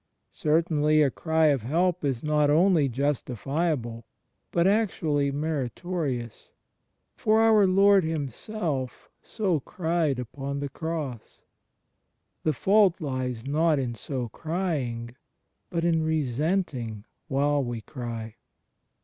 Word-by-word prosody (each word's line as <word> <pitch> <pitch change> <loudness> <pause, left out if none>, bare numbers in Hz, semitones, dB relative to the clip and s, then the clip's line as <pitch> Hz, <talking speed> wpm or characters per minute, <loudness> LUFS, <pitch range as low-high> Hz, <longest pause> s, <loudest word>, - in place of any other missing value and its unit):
Certainly 155 -1 +2
a 140 - +2
cry 160 +4 +1
of 135 - -2
help 170 +8 0
is 135 -5 -1
not 150 -1 +2
only 160 -2 +4
justi 135 +1 -1
fiable, 135 -3 -2 0.5
but 170 0 +2
actually 165 -9 +1
meritorious; 145 - -3 0.7
for 215 +1 +2
our 220 -3 +5
Lord 195 +1 +5
Himself 155 - -3
so 190 -8 -1
cried 160 -2 -1
upon 135 +3 -5
the 140 0 -3
Cross. 155 -7 -5 1.0
The 155 - +1
fault 195 - +3
lies 130 -5 -3
not 155 +2 +2
in 125 -3 -2
so 125 +1 -4
crying, 135 - -3 0.5
but 170 -1 -1
in 165 -2 +2
resenting 145 - -1 0.2
while 145 0 +1
we 120 -2 -4
cry. 115 -3 -7
150 Hz, 110 wpm, -26 LUFS, 130-170 Hz, 1.0 s, our